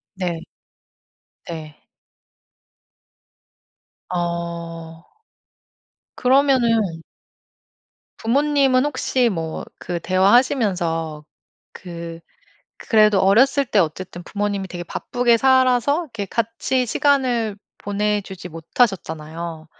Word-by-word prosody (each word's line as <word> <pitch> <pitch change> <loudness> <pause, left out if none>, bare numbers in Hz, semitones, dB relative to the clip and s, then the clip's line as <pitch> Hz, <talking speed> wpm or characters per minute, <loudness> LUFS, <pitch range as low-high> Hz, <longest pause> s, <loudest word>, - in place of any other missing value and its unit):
네. 175 -3 -3 1.1
네. 155 -2 -8 2.3
어. 170 -2 -4 1.1
그러면은 240 -9 +2 1.2
부모님은 275 +1 +2
혹시 255 -3 +1
뭐 165 -5 -4
그 175 -1 -4
대화하시면서 185 - +2 0.5
그 170 -2 -8 0.6
그래도 215 -3 +3
어렸을 255 +9 +4
때 210 -4 +3
어쨌든 175 +2 -3
부모님이 200 0 -3
되게 175 -1 -6
바쁘게 245 +5 +1
살아서 260 +4 +3
이렇게 230 -8 -6
같이 230 +4 -1
시간을 245 -5 +1 0.2
보내 210 +1 -1
주지 190 -2 -9
못하셨잖아요. 165 -3 -2
200 Hz, 190 characters per minute, -21 LUFS, 170-245 Hz, 2.3 s, 어렸을